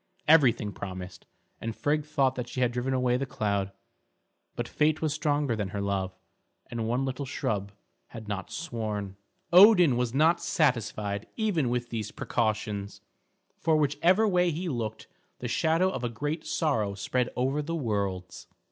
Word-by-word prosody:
Everything 130 Hz, -9 st, +5 dB
promised, 95 Hz, -2 st, -8 dB, 0.3 s
and 115 Hz, -1 st, -4 dB
Frigg 150 Hz, +1 st, 0 dB
thought 130 Hz, -5 st, 0 dB
she -, -, -5 dB
had 125 Hz, -1 st, +3 dB
driven 125 Hz, +2 st, -2 dB
away 125 Hz, -1 st, +2 dB
the 135 Hz, -, -2 dB
cloud; 100 Hz, -4 st, -1 dB, 0.8 s
but -, -, -3 dB
fate 155 Hz, +1 st, +1 dB
was 155 Hz, -2 st, 0 dB
stronger 145 Hz, -4 st, 0 dB
than 105 Hz, -3 st, -2 dB
her 100 Hz, -, -4 dB
love, 95 Hz, -2 st, -2 dB, 0.5 s
and 115 Hz, -1 st, -2 dB
one 125 Hz, +4 st, 0 dB
little 130 Hz, +1 st, -3 dB
shrub 100 Hz, -5 st, -2 dB, 0.4 s
had 110 Hz, -3 st, -10 dB
not 100 Hz, -2 st, -4 dB
sworn. 110 Hz, -, -4 dB, 0.4 s
Odin 180 Hz, -, +8 dB
was 125 Hz, -1 st, 0 dB
not 160 Hz, +6 st, +3 dB
satisfied 110 Hz, -, 0 dB
even 190 Hz, -, +1 dB
with 120 Hz, 0 st, -2 dB
these 110 Hz, -3 st, -3 dB
precautions, 105 Hz, -3 st, -2 dB, 0.6 s
for 160 Hz, -1 st, +2 dB
whichever 170 Hz, +8 st, +3 dB
way 180 Hz, -3 st, +3 dB
he 170 Hz, +3 st, -3 dB
looked 115 Hz, -7 st, -3 dB, 0.3 s
the 125 Hz, -, -5 dB
shadow 165 Hz, +8 st, +2 dB
of 130 Hz, -, -5 dB
a 120 Hz, -, 0 dB
great 145 Hz, +7 st, -4 dB
sorrow 110 Hz, -11 st, 0 dB
spread 125 Hz, +5 st, -1 dB
over 135 Hz, +4 st, 0 dB
the 165 Hz, +3 st, -3 dB
worlds. 100 Hz, -, -3 dB
125 Hz, 155 wpm, -28 LUFS, 105-150 Hz, 0.8 s, Odin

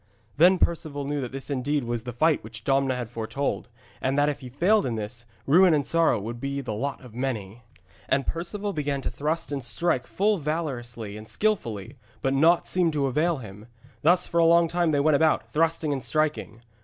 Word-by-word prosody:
Then 180 Hz, +5 st, +6 dB
Perceval 155 Hz, -5 st, -1 dB
knew 145 Hz, 0 st, -2 dB
that 125 Hz, -, -5 dB
this 135 Hz, +2 st, -6 dB
indeed 140 Hz, +1 st, 0 dB
was 120 Hz, -1 st, -3 dB
the 125 Hz, -, -4 dB
fight 155 Hz, +6 st, +2 dB
which 110 Hz, 0 st, -10 dB
Domna 135 Hz, 0 st, +2 dB
had 125 Hz, -2 st, -4 dB
foretold, 120 Hz, +5 st, -3 dB, 0.3 s
and 135 Hz, +2 st, 0 dB
that 145 Hz, +1 st, +4 dB
if 145 Hz, -, -3 dB
he 130 Hz, -, -9 dB
failed 195 Hz, -, +3 dB
in 120 Hz, -, -2 dB
this, 110 Hz, +2 st, -6 dB, 0.2 s
ruin 175 Hz, +3 st, +6 dB
and 145 Hz, -2 st, 0 dB
sorrow 165 Hz, -4 st, +2 dB
would 115 Hz, +4 st, -6 dB
be 140 Hz, +2 st, -3 dB
the 125 Hz, -5 st, -4 dB
lot 140 Hz, +6 st, -3 dB
of 125 Hz, -4 st, -13 dB
many. 120 Hz, -4 st, -4 dB, 0.5 s
And 135 Hz, 0 st, +2 dB
Perceval 195 Hz, +5 st, -3 dB
began 145 Hz, -2 st, -2 dB
to -, -, -3 dB
thrust 155 Hz, +2 st, -2 dB
and 140 Hz, -2 st, -3 dB
strike 125 Hz, +3 st, 0 dB
full 205 Hz, 0 st, +1 dB
valorously 120 Hz, -9 st, -4 dB
and 110 Hz, +1 st, -10 dB
skilfully, 120 Hz, -, -2 dB, 0.2 s
but 135 Hz, -, +1 dB
naught 165 Hz, +5 st, +4 dB
seemed 175 Hz, -3 st, +1 dB
to 145 Hz, -2 st, +1 dB
avail 155 Hz, +5 st, +1 dB
him. 105 Hz, -3 st, -10 dB, 0.3 s
Thus 175 Hz, +3 st, +4 dB
for 170 Hz, -, 0 dB
a -, -, +5 dB
long 170 Hz, 0 st, +5 dB
time 170 Hz, 0 st, +1 dB
they 145 Hz, -2 st, +2 dB
went 145 Hz, 0 st, +4 dB
about, 160 Hz, +1 st, +1 dB
thrusting 160 Hz, -1 st, +1 dB
and 135 Hz, -, -3 dB
striking. 135 Hz, -3 st, -1 dB
140 Hz, 205 wpm, -26 LUFS, 120-165 Hz, 0.5 s, Then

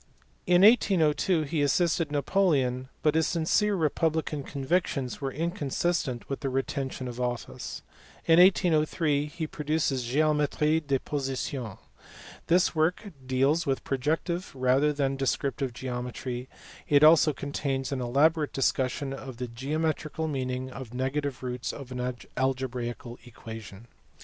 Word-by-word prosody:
In 180 Hz, +1 st, +5 dB
1802 180 Hz, -, +4 dB
he 150 Hz, +1 st, -1 dB
assisted 160 Hz, +2 st, +1 dB
Napoleon, 140 Hz, -5 st, +1 dB
but 150 Hz, -, +4 dB
his 160 Hz, 0 st, +2 dB
sincere 200 Hz, +5 st, +1 dB
republican 160 Hz, -2 st, 0 dB
convictions 140 Hz, -2 st, -2 dB
were 135 Hz, -1 st, -2 dB
inconsistent 160 Hz, -, -2 dB
with 135 Hz, -, -4 dB
the 135 Hz, -, -2 dB
retention 130 Hz, 0 st, -3 dB
of 125 Hz, 0 st, -6 dB
office. 120 Hz, -1 st, -4 dB, 0.4 s
In 165 Hz, +1 st, +6 dB
1803 155 Hz, -5 st, +3 dB
he 160 Hz, +2 st, -4 dB
produced 155 Hz, 0 st, -1 dB
his 130 Hz, -1 st, -1 dB
Geometric 150 Hz, +3 st, +1 dB
de 140 Hz, -1 st, +2 dB
position. 130 Hz, -5 st, -4 dB, 0.7 s
This 175 Hz, +2 st, +3 dB
work 175 Hz, +6 st, 0 dB
deals 135 Hz, +6 st, +1 dB
with 135 Hz, -1 st, 0 dB
protective 160 Hz, +6 st, -1 dB
rather 130 Hz, +3 st, +3 dB
than 135 Hz, -2 st, -1 dB
des 135 Hz, -1 st, +1 dB
criptive 135 Hz, -1 st, -2 dB
geometry, 125 Hz, 0 st, -5 dB, 0.4 s
it 145 Hz, 0 st, +5 dB
also 155 Hz, 0 st, +7 dB
contains 140 Hz, -1 st, -3 dB
an 135 Hz, -2 st, -2 dB
elaborate 150 Hz, +5 st, +2 dB
discussion 135 Hz, +1 st, 0 dB
of 130 Hz, -2 st, -8 dB
the 125 Hz, 0 st, -4 dB
geometrical 155 Hz, +5 st, -2 dB
meaning 130 Hz, -2 st, -3 dB
of 125 Hz, -2 st, -8 dB
negative 135 Hz, +1 st, -2 dB
roots 125 Hz, -1 st, -3 dB
of 135 Hz, -3 st, -9 dB
an 125 Hz, 0 st, -3 dB, 0.2 s
algebraical 125 Hz, -2 st, -3 dB
equation. 110 Hz, -3 st, -10 dB
140 Hz, 130 wpm, -28 LUFS, 130-155 Hz, 0.7 s, also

